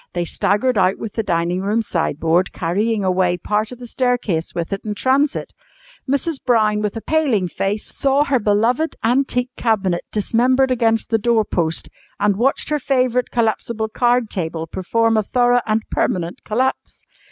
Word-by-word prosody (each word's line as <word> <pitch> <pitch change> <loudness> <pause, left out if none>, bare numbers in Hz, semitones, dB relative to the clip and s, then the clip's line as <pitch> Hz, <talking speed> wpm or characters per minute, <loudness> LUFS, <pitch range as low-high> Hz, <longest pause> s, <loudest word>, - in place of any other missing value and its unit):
They 175 -1 -1
staggered 210 +7 +1
out 185 0 +2
with 220 - -6
the 225 - -1
dining 175 -2 -1
room 210 +4 0
sideboard, 165 -1 0
carrying 205 +5 -1
away 180 -1 +1
part 210 +5 -1
of 250 - -8
the 245 - -10
staircase 240 -9 -1
with 170 +3 -3
it 195 - -4
in 210 -1 -4
transit. 270 +6 0 0.6
Mrs. 280 +2 -1
Brown, 215 -4 +2
with 210 0 -2
a - - -5
paling 270 -13 +1
face, 195 +4 -2
saw 275 +1 +2
her 275 -3 +1
beloved 230 +9 +1
antique 250 +1 +1
cabinet 195 -7 0
dismembered 255 +5 +2
against 225 -3 +1
the 225 - +3
doorpost, 210 -8 +1 0.3
and 205 -1 +2
watched 265 +7 0
her 300 -1 0
favourite 255 -2 +1
collapsible 225 -1 -1
card 240 0 +1
table 165 -3 -3
perform 225 +7 0
a - - +4
thorough 245 +3 +2
and 215 0 +1
permanent 175 -1 -1
collapse. 255 +5 -2
220 Hz, 160 wpm, -19 LUFS, 195-250 Hz, 0.6 s, a